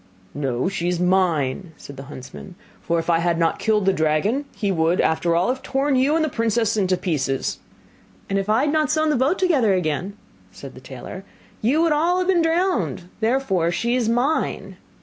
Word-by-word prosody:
'No, 130 Hz, -2 st, -1 dB
she 185 Hz, -3 st, -2 dB
is 180 Hz, -1 st, 0 dB
mine,' 180 Hz, -3 st, +1 dB
said 140 Hz, -, -11 dB
the 135 Hz, -, -8 dB
huntsman; 150 Hz, +6 st, -10 dB, 0.3 s
'for 170 Hz, -, -1 dB
if 165 Hz, -, -3 dB
I 170 Hz, -1 st, +3 dB
had 170 Hz, 0 st, +1 dB
not 165 Hz, -1 st, +1 dB
killed 215 Hz, -3 st, +1 dB
the 195 Hz, -, +3 dB
dragon, 160 Hz, -, 0 dB
he 205 Hz, -2 st, -1 dB
would, 165 Hz, 0 st, +1 dB
after 165 Hz, +1 st, +1 dB
all, 175 Hz, +5 st, +2 dB
have 260 Hz, +1 st, -2 dB
torn 275 Hz, +1 st, 0 dB
you 270 Hz, +4 st, +3 dB
and 320 Hz, -1 st, +2 dB
the -, -, -1 dB
princess 225 Hz, -2 st, 0 dB
into 190 Hz, -3 st, +1 dB
pieces.' 135 Hz, -7 st, -2 dB, 0.7 s
'And 195 Hz, 0 st, 0 dB
if 195 Hz, +1 st, -4 dB
I 220 Hz, +3 st, +3 dB
had 295 Hz, +1 st, 0 dB
not 310 Hz, -3 st, +1 dB
sewn 310 Hz, 0 st, +2 dB
the -, -, +1 dB
boat 265 Hz, +9 st, +1 dB
together 270 Hz, -, +2 dB
again,' 180 Hz, +4 st, -2 dB, 0.3 s
said 135 Hz, +7 st, -11 dB
the 130 Hz, -, -13 dB
tailor, 135 Hz, +9 st, -9 dB, 0.4 s
'you 280 Hz, +9 st, +2 dB
would 335 Hz, -, +2 dB
all 330 Hz, +4 st, +2 dB
have 370 Hz, -, 0 dB
been 360 Hz, -3 st, +4 dB
drowned, 325 Hz, -, 0 dB
therefore 220 Hz, -7 st, +1 dB
she 235 Hz, +7 st, 0 dB
is 240 Hz, -3 st, 0 dB
mine. 250 Hz, +7 st, -1 dB
195 Hz, 200 wpm, -22 LUFS, 165-270 Hz, 0.7 s, been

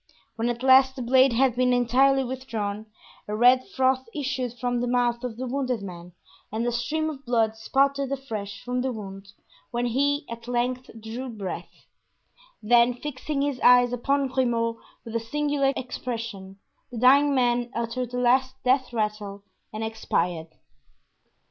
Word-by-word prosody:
When 230 Hz, +1 st, -1 dB
at 240 Hz, +1 st, -4 dB
last 265 Hz, 0 st, +6 dB
the 260 Hz, -, -5 dB
blade 260 Hz, +1 st, +4 dB
had 250 Hz, 0 st, +2 dB
been 250 Hz, 0 st, +2 dB
entirely 265 Hz, +3 st, +3 dB
withdrawn, 220 Hz, -5 st, -4 dB, 0.4 s
a 210 Hz, -, -3 dB
red 250 Hz, +3 st, +5 dB
froth 260 Hz, -1 st, +1 dB
issued 260 Hz, -4 st, -2 dB
from 245 Hz, 0 st, -1 dB
the 245 Hz, -, -1 dB
mouth 240 Hz, -1 st, +1 dB
of 240 Hz, -3 st, -5 dB
the 260 Hz, -, -4 dB
wounded 255 Hz, -4 st, -2 dB
man 180 Hz, -2 st, -9 dB, 0.4 s
and 225 Hz, +2 st, -2 dB
a 240 Hz, -, +1 dB
stream 300 Hz, +7 st, -1 dB
of 285 Hz, -3 st, -6 dB
blood 225 Hz, -3 st, +1 dB
spouted 275 Hz, +4 st, +1 dB
afresh 215 Hz, -7 st, -5 dB
from 250 Hz, 0 st, -2 dB
the 260 Hz, +1 st, -1 dB
wound 200 Hz, -3 st, -9 dB, 0.4 s
when 240 Hz, +1 st, -2 dB
he 285 Hz, +4 st, +1 dB
at 230 Hz, 0 st, -9 dB
length 245 Hz, +1 st, -1 dB
drew 230 Hz, +4 st, -6 dB
breath; 205 Hz, -5 st, -7 dB, 0.8 s
then, 240 Hz, +2 st, +4 dB
fixing 280 Hz, +1 st, -3 dB
his 285 Hz, -3 st, -2 dB
eyes 245 Hz, 0 st, +5 dB
upon 275 Hz, +3 st, 0 dB
Grimaud 235 Hz, -3 st, 0 dB, 0.3 s
with 230 Hz, 0 st, -7 dB
a -, -, +2 dB
singular 285 Hz, +3 st, 0 dB
expression, 230 Hz, -6 st, -6 dB, 0.3 s
the 240 Hz, -, -7 dB
dying 275 Hz, +4 st, +5 dB
man 245 Hz, -1 st, +1 dB
uttered 235 Hz, +1 st, -2 dB
the 250 Hz, -, -5 dB
last 260 Hz, +1 st, +2 dB
death 255 Hz, 0 st, +2 dB
rattle 210 Hz, -3 st, -3 dB, 0.3 s
and 215 Hz, +1 st, -5 dB
expired. 175 Hz, -7 st, -2 dB
245 Hz, 155 wpm, -25 LUFS, 225-260 Hz, 0.8 s, last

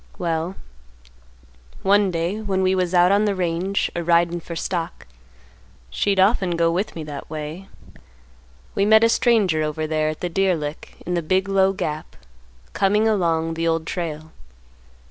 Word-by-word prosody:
"Well, 170 Hz, +1 st, -2 dB, 1.3 s
one 200 Hz, 0 st, +4 dB
day, 175 Hz, +5 st, -2 dB
when 190 Hz, -3 st, -1 dB
we 185 Hz, 0 st, +3 dB
was 185 Hz, -1 st, 0 dB
out 175 Hz, +1 st, +5 dB
on 205 Hz, +1 st, +3 dB
the 205 Hz, -1 st, 0 dB
range 180 Hz, +2 st, -1 dB
a 170 Hz, -, -2 dB
ridin' 170 Hz, 0 st, +2 dB
for 170 Hz, +1 st, -8 dB
stock—she'd 65 Hz, -, -5 dB
often 190 Hz, -3 st, +3 dB
go 165 Hz, 0 st, +2 dB
with 185 Hz, +5 st, -2 dB
me 160 Hz, -, -5 dB
that 145 Hz, -2 st, -8 dB
way—we 65 Hz, -, -9 dB
met 220 Hz, +1 st, +6 dB
a 230 Hz, -, +5 dB
stranger 210 Hz, -10 st, +2 dB
over 155 Hz, 0 st, -2 dB
there 155 Hz, 0 st, 0 dB
at 155 Hz, -, -6 dB
the 180 Hz, -, -1 dB
deer 190 Hz, +1 st, +2 dB
lick 150 Hz, -1 st, -6 dB
in 180 Hz, -, -2 dB
the 175 Hz, -, 0 dB
big 185 Hz, +4 st, 0 dB
low 195 Hz, -1 st, +3 dB
gap, 155 Hz, -5 st, -5 dB, 0.6 s
coming 210 Hz, +3 st, +2 dB
along 165 Hz, -6 st, +1 dB
the 165 Hz, +1 st, -2 dB
Old 165 Hz, -1 st, 0 dB
Trail. 160 Hz, -3 st, -5 dB
170 Hz, 155 wpm, -22 LUFS, 155-190 Hz, 1.3 s, met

